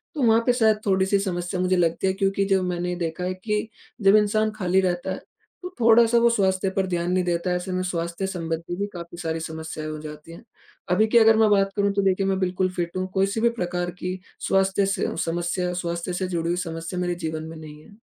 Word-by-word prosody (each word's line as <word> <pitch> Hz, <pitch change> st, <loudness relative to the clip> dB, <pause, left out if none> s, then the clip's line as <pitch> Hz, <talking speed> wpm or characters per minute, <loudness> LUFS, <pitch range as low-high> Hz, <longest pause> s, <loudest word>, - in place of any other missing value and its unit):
तो 295 Hz, -, -2 dB
वहाँ 225 Hz, -1 st, +5 dB
पे 245 Hz, -, +4 dB
शायद 220 Hz, -3 st, +3 dB
थोड़ी-सी 190 Hz, 0 st, +2 dB
समस्या 180 Hz, -2 st, -3 dB
मुझे 185 Hz, 0 st, +2 dB
लगती 170 Hz, +2 st, +1 dB
है 190 Hz, -, +2 dB
क्योंकि 195 Hz, 0 st, 0 dB
जो 195 Hz, -1 st, +3 dB
मैंने 180 Hz, 0 st, -2 dB
देखा 170 Hz, 0 st, -3 dB
है 185 Hz, +1 st, -1 dB
कि 210 Hz, +3 st, -2 dB, 0.3 s
जब 195 Hz, +1 st, +6 dB
इंसान 215 Hz, +1 st, +3 dB
खाली 190 Hz, -2 st, +2 dB
रहता 175 Hz, -1 st, -1 dB
है, -, -, -3 dB, 0.4 s
तो 360 Hz, -, -6 dB
थोड़ा-सा 230 Hz, 0 st, +5 dB
वो 235 Hz, 0 st, +5 dB
स्वास्थ्य 195 Hz, -4 st, +1 dB
पर 195 Hz, -, +1 dB
ध्यान 175 Hz, -1 st, -1 dB
नहीं 185 Hz, 0 st, +2 dB
देता 175 Hz, 0 st, -1 dB
है। 180 Hz, -, +1 dB
ऐसे 180 Hz, +1 st, -4 dB
में 185 Hz, 0 st, -1 dB
स्वास्थ्य 170 Hz, +1 st, -3 dB
संबंधी 165 Hz, -2 st, -4 dB
भी 200 Hz, +3 st, -2 dB
काफ़ी 170 Hz, -1 st, -8 dB
सारी 165 Hz, -1 st, -3 dB
समस्याएँ 160 Hz, -1 st, -6 dB
हो 155 Hz, -, -5 dB
जाती 150 Hz, +1 st, -9 dB
हैं। 170 Hz, -, -12 dB, 0.5 s
अभी 215 Hz, +5 st, +4 dB
की 230 Hz, -, +4 dB
अगर 225 Hz, -1 st, +6 dB
मैं 220 Hz, -1 st, +5 dB
बात 195 Hz, -1 st, +3 dB
करूँ 200 Hz, -1 st, +2 dB
तो 200 Hz, -, +1 dB
देखिए 195 Hz, 0 st, +1 dB
मैं 190 Hz, -1 st, 0 dB
बिल्कुल 185 Hz, 0 st, 0 dB
फिट 175 Hz, 0 st, -3 dB
हूँ। 185 Hz, 0 st, -1 dB
कोई 195 Hz, 0 st, +3 dB
सी 220 Hz, -, -1 dB
भी 235 Hz, -, +4 dB
प्रकार 175 Hz, 0 st, -2 dB
की 185 Hz, +1 st, -4 dB, 0.3 s
स्वास्थ्य 195 Hz, +1 st, +2 dB
से 195 Hz, 0 st, -1 dB
समस्या 175 Hz, +2 st, -1 dB
स्वास्थ्य 170 Hz, +1 st, -3 dB
से 185 Hz, +1 st, -2 dB
जुड़ी 170 Hz, -2 st, -2 dB
हुई 175 Hz, -, 0 dB
समस्या 165 Hz, +2 st, -5 dB
मेरे 175 Hz, -1 st, -1 dB
जीवन 160 Hz, 0 st, -3 dB
में 160 Hz, 0 st, -9 dB
नहीं 150 Hz, -1 st, -11 dB
है। 205 Hz, -, -17 dB
185 Hz, 230 wpm, -24 LUFS, 170-200 Hz, 0.5 s, जब